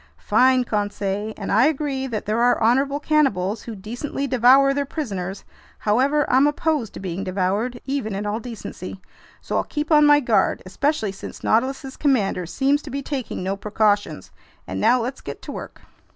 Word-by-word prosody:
"Fine, 255 0 +3
Conseil! 205 -1 -2
And 200 - -4
I 225 +7 +5
agree 280 -3 -1
that 225 -4 -4
there 215 +3 0
are 245 0 +3
honorable 270 +5 +2
cannibals 230 -11 +1
who 230 - -7
decently 240 +8 -4
devour 265 +2 +5
their 285 +1 0
prisoners. 200 - -5 0.3
However, 270 +7 +2
I'm 265 +3 +4
opposed 295 -6 -1
to - - -6
being 190 0 -4
devoured, 200 +6 -1
even 265 -7 -2
in 205 +1 -3
all 210 +2 -1
decency, 220 -5 -8 0.4
so - - -2
I'll - - +1
keep 300 +1 -4
on 300 -1 +6
my 290 0 +7
guard, 225 -8 +1
especially 220 +2 -1
since 195 - -9
the - - -7
Nautilus's 265 +4 0
commander 210 - +1
seems 275 - +1
to 295 - -10
be 275 +1 -4
taking 260 -10 -4
no 190 +1 -1
precautions. 205 0 0 0.3
And - - -4
now 240 +4 +4
let's 250 +3 -4
get - - -7
to - - -6
work!" - - -8
245 Hz, 180 wpm, -22 LUFS, 205-275 Hz, 0.4 s, my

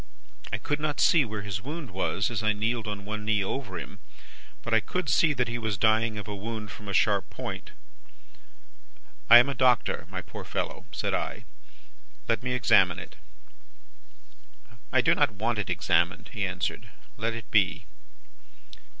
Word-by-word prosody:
I - - 0
could 145 0 -2
not 150 -1 -2
see 165 -4 +5
where 110 -2 -5
his 100 -2 -4
wound 150 - -6
was, 95 +3 -1
as 110 - -2
I 110 0 +2
kneeled 110 +1 -1
on 100 -1 -5
one 105 +1 -4
knee 105 -2 +1
over 95 -3 -4
him; 100 +4 -8 0.6
but, 115 - -3
I 110 - +6
could 180 +12 -3
see 160 - +4
that 125 -2 0
he 120 +1 -3
was 110 -3 -2
dying 110 +1 +2
of 105 - -6
a 105 - -4
wound 105 0 -6
from 105 - -11
a - - -3
sharp 100 0 +2
point. - - -6 1.6
"'I 120 - +12
am 120 +3 +6
a - - -1
doctor, 125 -2 +2
my - - -5
poor - - -9
fellow,' - - -4
said - - -2
I. - - -3 0.8
'Let 115 -2 +1
me 125 0 -2
examine 120 -5 +4
it.' - - -10 1.7
"'I - - +4
do - - +4
not 105 - +2
want 110 +2 -1
it 100 - -2
examined,' 85 0 +1
he 105 -4 -1
answered; 90 -1 -3 0.3
'let 115 +2 -1
it 115 -3 -9
be. 100 -4 +2
110 Hz, 175 wpm, -27 LUFS, 100-120 Hz, 1.7 s, I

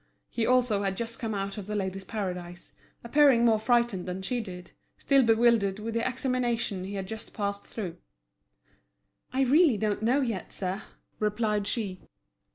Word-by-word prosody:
He 230 -1 0
also 245 -5 +3
had 195 -1 -1
just 230 0 -5
come 220 -3 -2
out 195 +1 -3
of 200 - -8
The 210 - -3
Ladies' 190 -1 -2
Paradise, 180 -5 -5 0.3
appearing 255 -1 +5
more 225 -2 +4
frightened 235 -5 +1
than 185 +1 -4
she 245 +4 -1
did, 180 -4 -9 0.3
still 275 -1 +4
bewildered 225 -4 +3
with 220 +2 -5
the 230 +2 0
examination 245 -6 -1
he 200 +1 -5
had 195 -1 -3
just 220 +2 -8
passed 200 -1 -3
through. 180 -6 -5 1.3
"I 260 +1 0
really 280 -1 +5
don't 210 0 -1
know 250 +6 +3
yet, 225 -8 -3
sir," 190 +1 -3 0.4
replied 210 -1 0
she. 200 -6 -2
220 Hz, 165 wpm, -28 LUFS, 195-240 Hz, 1.3 s, appearing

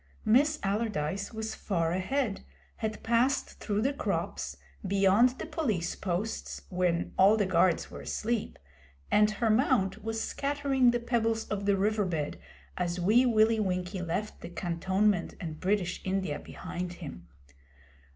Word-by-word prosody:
Miss 290 +7 +4
Allardyce 200 -3 -1
was 220 -1 -4
far 170 -5 -1
ahead, 205 +5 -1 0.4
had 215 -1 -4
passed 240 +4 +1
through 210 +1 -1
the 275 +3 +1
crops, 280 - -3 0.3
beyond 200 +6 +4
the - - -5
Police 215 - -1
posts, 190 +4 -3
when 180 -2 0
all 200 +3 +7
the 205 - +2
guards 185 -2 +2
were - - -8
asleep, 230 0 -2 0.5
and 210 0 +5
her 220 +1 +1
mount 215 -4 +2
was 225 0 -2
scattering 275 -1 +1
the 240 0 +2
pebbles 225 -2 0
of 200 -1 -2
the 200 -1 +4
river 210 +1 +1
bed 160 -5 -3 0.4
as 175 0 -2
Wee 220 +8 +4
Willie 220 -1 +4
Winkie 185 -1 -1
left 180 +5 -3
the - - -7
cantonment 185 +2 0
and 160 -2 -6
British 185 -2 0
India 190 -5 -1
behind 180 0 -6
him. 140 - -9
205 Hz, 140 wpm, -29 LUFS, 180-225 Hz, 0.5 s, all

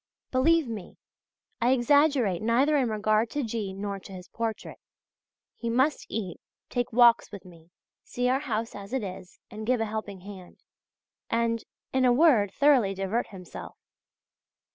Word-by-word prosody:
Believe 315 +3 +3
me, 215 -6 -7 0.6
I 245 +2 +4
exaggerate 265 - +3
neither 250 +7 +3
in 260 -5 +2
regard 215 +1 +1
to 290 +2 -2
G. 220 -4 -3
nor 200 +1 -5
to 195 - -13
his 180 -1 -10
portrait. 225 -1 -5 0.8
He 235 - -4
must 265 +6 +1
eat, 195 -6 -5 0.3
take 245 -1 -1
walks 235 0 +5
with 200 -3 -10
me, 170 -2 -16 0.3
see 245 0 -2
our 260 +2 +2
house 230 -5 -3
as 200 +3 -9
it 265 -4 -1
is, 185 -1 -8
and 215 +1 -7
give 250 -1 +2
a 225 - 0
helping 210 -3 -5
hand,{GG} 190 -2 -11 0.7
and, 230 -1 0 0.3
in 260 0 +2
a 250 - +5
word, 240 - +4
thoroughly 260 -9 +3
divert 195 +5 -1
himself. 180 -3 -10
230 Hz, 155 wpm, -27 LUFS, 200-255 Hz, 0.8 s, walks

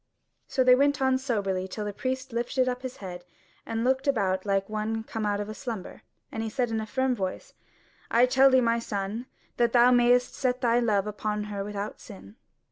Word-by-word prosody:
So 260 - +1
they 255 0 +7
went 280 +2 +3
on 265 -1 +2
soberly 200 -8 -1
till 210 +2 -5
the 205 - -4
priest 260 +2 -4
lifted 245 +2 0
up 250 0 -2
his 255 -1 -6
head 180 -3 -8 0.4
and 225 0 -2
looked 265 +3 +1
about 195 -7 +1
like 195 -1 +1
one 215 +1 -2
come 220 -1 -3
out 205 0 0
of 210 +1 -5
slumber, 225 -8 -6 0.3
and 225 0 -4
said 245 0 -1
in 220 -1 -1
a 215 - -6
firm 260 +3 0
voice: 190 -5 -4 0.6
"I 235 +2 +5
tell 265 +2 +5
thee, 260 -1 +5
my 230 -1 +2
son, 215 +2 -4 0.3
that 235 -1 +2
thou 245 0 +6
mayest 245 0 +4
set 255 -2 -1
thy 235 0 +3
love 210 -5 +1
upon 210 0 -3
her 200 -1 -3
without 205 0 -5
sin." 95 +2 -12
230 Hz, 200 wpm, -27 LUFS, 205-255 Hz, 0.6 s, they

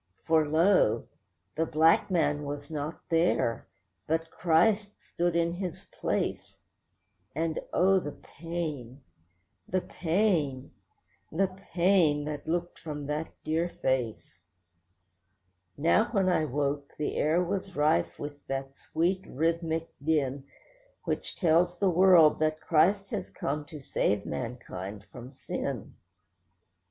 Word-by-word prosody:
For 160 -2 +3
lo! 160 - +3 0.5
the 160 +1 0
black 160 +6 +4
man 150 -5 +1
was 145 +2 -6
not 150 +1 -4
there, 165 -8 +1 0.4
but 160 +1 -1
Christ 200 +5 +2
stood 175 0 -2
in 170 0 +2
his 180 -1 -5
place; - - -2 0.8
And 160 0 -1
oh! 190 +1 +4
the 145 -5 -6
pain, 150 -6 -5 0.7
the 185 +1 +1
pain, 165 -9 0 0.6
the 195 +5 +2 0.3
pain 170 -5 +3
that 150 0 -5
looked 175 +1 -2
from 150 -3 -6
that 150 +2 -3
dear 165 +3 0
face. 125 - -2 1.4
Now 170 +9 +4
when 195 -6 +1
I 165 -3 +2
woke, 140 0 -2
the 150 - -2
air 165 +4 +2
was 185 +1 -3
rife 85 - +2
with 145 0 -7
that 135 0 -4
sweet, 185 +6 -1
rhythmic 165 +2 -1
din 140 -3 0 0.6
Which - - -3
tells 175 0 +3
the 195 0 +2
world 175 -3 +6
that 155 0 +1
Christ 195 +6 +2
has - - -3
come 145 +1 -3
to 150 +1 -9
save 105 -6 0
mankind 105 -5 -6
from 125 0 -9
sin. 135 - -5
160 Hz, 120 wpm, -29 LUFS, 145-175 Hz, 1.4 s, world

